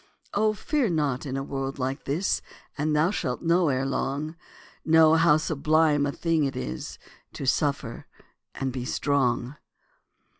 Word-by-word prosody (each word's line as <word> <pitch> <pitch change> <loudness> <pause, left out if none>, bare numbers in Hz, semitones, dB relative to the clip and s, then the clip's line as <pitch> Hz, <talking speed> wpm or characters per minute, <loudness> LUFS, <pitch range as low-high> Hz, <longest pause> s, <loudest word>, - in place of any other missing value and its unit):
Oh, 215 +1 +2
fear 260 +3 0
not 145 -4 -1
in 135 0 -3
a 135 - -2
world 135 -1 -4
like 135 +2 -3
this, 160 +8 0 0.3
And 150 +1 0
thou 160 +5 +3
shalt 125 -10 -3
know 170 0 +3
ere 130 0 0
long, 140 +3 -2 0.5
Know 160 0 +6
how 165 -2 +5
sublime 155 -1 +2
a - - -1
thing 165 0 0
it 135 -1 -1
is 65 - -5 0.4
To - - -5
suffer 140 -3 -1 0.5
and 135 -2 -3
be 125 -1 -4
strong. 135 0 0
145 Hz, 150 wpm, -26 LUFS, 135-160 Hz, 0.5 s, Know